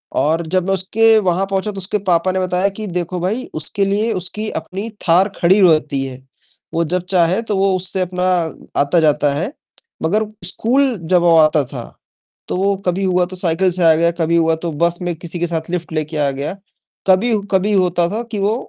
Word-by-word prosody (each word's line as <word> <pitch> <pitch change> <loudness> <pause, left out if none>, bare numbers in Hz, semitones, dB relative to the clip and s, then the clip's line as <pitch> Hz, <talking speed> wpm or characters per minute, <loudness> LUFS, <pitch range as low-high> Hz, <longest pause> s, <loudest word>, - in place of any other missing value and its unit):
और 155 +5 +1
जब 185 +1 0
मैं 195 - +2
उसके 220 +4 +3
वहाँ 190 0 +1
पहुँचा 195 +2 -1
तो 200 - -11
उसके 195 +2 -1
पापा 175 +2 +2
ने 190 - -1
बताया 185 +2 +1
कि 215 +2 -7
"देखो 180 0 -3
भई, 210 +9 -2
उसके 175 +6 -1
लिए 210 +3 0
उसकी 210 +4 -4
अपनी 190 +7 -5 0.2
थार 185 +5 +4
खड़ी 190 +3 +4
रहती 155 -6 +3
है। 130 -1 -7 0.6
वो 170 - +1
जब 180 +3 -1
चाहे 180 +3 +2
तो 210 -4 -2
वो 195 -1 +2
उससे 185 +1 -2
अपना 180 0 -2 0.6
आता-जाता 150 -1 +2
है।" 185 - -3 0.5
मगर 210 +7 +1 0.2
स्कूल 255 +4 +1 0.2
जब 175 - +5
वो 170 -1 +4
आता 155 -2 +4
था 125 -2 -6 0.6
तो - - -2
वो 200 +1 +1
कभी 180 +2 0
हुआ 180 -1 +2
तो 185 +1 -9
साइकिल 180 +1 +1
से 175 0 0
आ 165 -1 +7
गया, 170 +1 +2
कभी 170 0 0
हुआ 165 -1 +3
तो 170 - -2
बस 170 +3 0
में 175 -2 -2
किसी 170 +1 -6
के 175 - 0
साथ 165 0 -4
लिफ्ट 170 -2 -4
लेके 155 0 -3
आ 145 -2 +1
गया। 140 +5 -4 0.5
कभी, 195 +5 +3 0.2
कभी 195 +2 +2
होता 180 -2 +2
था 220 +4 -2
कि 210 - -3
वो 205 +3 +1
180 Hz, 205 wpm, -18 LUFS, 165-195 Hz, 0.6 s, आ